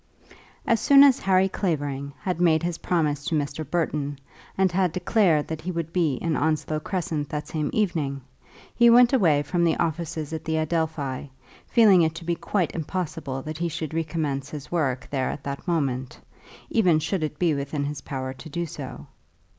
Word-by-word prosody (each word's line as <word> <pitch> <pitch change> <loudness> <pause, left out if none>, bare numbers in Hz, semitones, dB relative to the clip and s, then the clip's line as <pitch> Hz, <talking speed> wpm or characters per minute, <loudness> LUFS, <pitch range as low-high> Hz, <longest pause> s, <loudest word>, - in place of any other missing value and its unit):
] - - -27
As 230 - +1
soon 280 +4 +7
as 275 -2 +6
Harry 190 0 +3
Clavering 145 -7 -2
had 180 -2 -2
made 165 -2 +4
his 175 -1 -2
promise 150 -5 0
to 165 - 0
Mr. 145 +1 -2
Burton, 150 -4 -1 0.4
and 190 -1 +3
had 180 -2 +1
declared 180 -4 +2
that 160 -1 -5
he 175 - -5
would 165 -1 -4
be 165 -7 +2
in 160 +4 -1
Onslow 155 0 0
Crescent 160 -4 -3
that 150 0 -4
same 155 -2 -2
evening, 155 -10 -1 0.5
he 235 -1 +5
went 240 +2 +6
away 160 - +4
from 170 +4 0
the 165 - +3
offices 165 -2 -2
at 160 - -4
the 160 -1 -1
Adelphi, 155 -4 -2 0.4
feeling 210 -6 +6
it 160 0 +1
to 165 0 -8
be 170 - +1
quite 180 +1 -1
impossible 160 -5 -4
that 155 0 -6
he 170 0 0
should 160 -1 -5
recommence 150 -4 -2
his 150 -2 -8
work 135 -7 -1
there 135 -2 0
at 140 - -6
that 140 +5 -6
moment, 135 -7 -1 0.5
even 185 -8 +4
should 160 +4 -1
it 155 -1 -2
ever - - -30
be 170 -3 +2
within 140 +1 -2
his 145 0 -4
power 130 -1 -4
to 130 +4 -11
do 170 +3 -2
so. 150 -5 -8
160 Hz, 190 wpm, -25 LUFS, 145-175 Hz, 0.5 s, soon